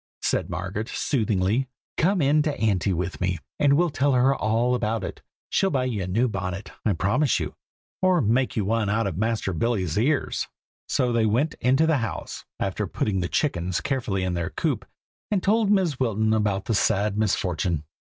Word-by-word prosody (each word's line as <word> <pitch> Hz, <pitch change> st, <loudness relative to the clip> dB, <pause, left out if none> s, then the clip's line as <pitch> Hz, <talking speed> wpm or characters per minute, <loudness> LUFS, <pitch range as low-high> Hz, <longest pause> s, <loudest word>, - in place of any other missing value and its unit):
said -, -, 0 dB
Margaret, 105 Hz, +5 st, -4 dB
soothingly; 110 Hz, -1 st, 0 dB, 0.3 s
"come 185 Hz, -1 st, +2 dB
in 145 Hz, +2 st, +4 dB
to 150 Hz, -1 st, -2 dB
Auntie 100 Hz, -4 st, +1 dB
with 90 Hz, +1 st, -3 dB
me, 90 Hz, -1 st, 0 dB, 0.2 s
and 140 Hz, -1 st, +4 dB
we'll 170 Hz, +3 st, +3 dB
tell 140 Hz, +1 st, +2 dB
her 130 Hz, +2 st, +4 dB
all 115 Hz, +3 st, +1 dB
about 115 Hz, -3 st, -1 dB
it. -, -, -6 dB, 0.3 s
She'll 195 Hz, -, +2 dB
buy 135 Hz, -6 st, 0 dB
you 115 Hz, -6 st, -2 dB
a 90 Hz, -, -3 dB
new 115 Hz, +8 st, +2 dB
bonnet, 95 Hz, -2 st, -4 dB
I 105 Hz, -, +2 dB
promise 100 Hz, -, +1 dB
you, -, -, -4 dB, 0.5 s
or 185 Hz, -1 st, +4 dB
make 125 Hz, +2 st, +1 dB
you 105 Hz, -, 0 dB
one 110 Hz, 0 st, +1 dB
out 115 Hz, +2 st, +1 dB
of 95 Hz, -5 st, -2 dB
Master 110 Hz, -3 st, 0 dB
Billy's 95 Hz, -2 st, 0 dB
ears." 140 Hz, +5 st, 0 dB, 0.4 s
So 125 Hz, -1 st, +1 dB
they 115 Hz, -1 st, +3 dB
went 130 Hz, +9 st, +1 dB
into 135 Hz, +5 st, +4 dB
the 160 Hz, -2 st, +3 dB
house, 115 Hz, -3 st, -5 dB
after -, -, -1 dB
putting 100 Hz, -3 st, -1 dB
the 85 Hz, -, -2 dB
chickens 90 Hz, -, 0 dB
carefully 120 Hz, -9 st, -1 dB
in 90 Hz, -1 st, -1 dB
their 85 Hz, -2 st, -2 dB
coop, -, -, -2 dB, 0.4 s
and 200 Hz, -4 st, 0 dB
told 215 Hz, +1 st, +3 dB
Mrs. 185 Hz, -9 st, +2 dB
Wilton 110 Hz, -3 st, +1 dB
about 105 Hz, -3 st, 0 dB
the 115 Hz, -, 0 dB
sad 105 Hz, 0 st, +2 dB
misfortune. 90 Hz, -6 st, 0 dB
110 Hz, 185 wpm, -25 LUFS, 95-135 Hz, 0.5 s, in